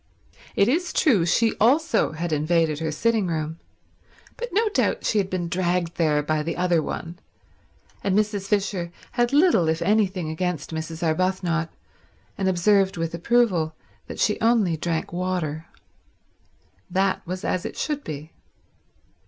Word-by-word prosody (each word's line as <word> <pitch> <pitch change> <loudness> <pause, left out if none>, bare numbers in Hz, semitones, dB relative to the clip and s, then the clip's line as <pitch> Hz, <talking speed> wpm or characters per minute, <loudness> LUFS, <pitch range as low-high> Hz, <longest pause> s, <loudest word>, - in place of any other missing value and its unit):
It 200 - +4
is 340 +7 0
true 215 - +3
she 225 +5 +3
also 285 - +3
had 165 +1 -3
invaded 155 0 +1
her 160 -1 -2
sitting 220 +4 +1
room, 160 -1 -3 0.8
but 485 0 -5
no 435 +5 +2
doubt - - 0
she 215 - +2
had 190 -1 -1
been 180 -2 -2
dragged 175 -1 0
there 150 -3 +2
by 155 +1 0
the 165 +2 -3
other 175 -2 +2
one, 170 +3 -6 0.8
and 195 0 +1
Mrs. 210 -2 0
Fisher 195 -4 -1 0.2
had 240 -1 +1
little 290 - +4
if 160 0 0
anything 190 -4 +1
against 165 -2 -3
Mrs. 160 +1 -5
Arbuthnot, 170 0 0 0.7
and 190 -1 0
observed 190 +1 +3
with 165 0 -2
approval 175 -4 +1 0.3
that - - -7
she 210 - +1
only 220 -7 +3
drank 165 +1 -3
water. 175 -3 -2 1.2
That 190 +1 +1
was 185 +1 -4
as 180 - -1
it - - -6
should 295 -2 -2
be. 155 +1 -7
180 Hz, 145 wpm, -24 LUFS, 165-210 Hz, 1.2 s, It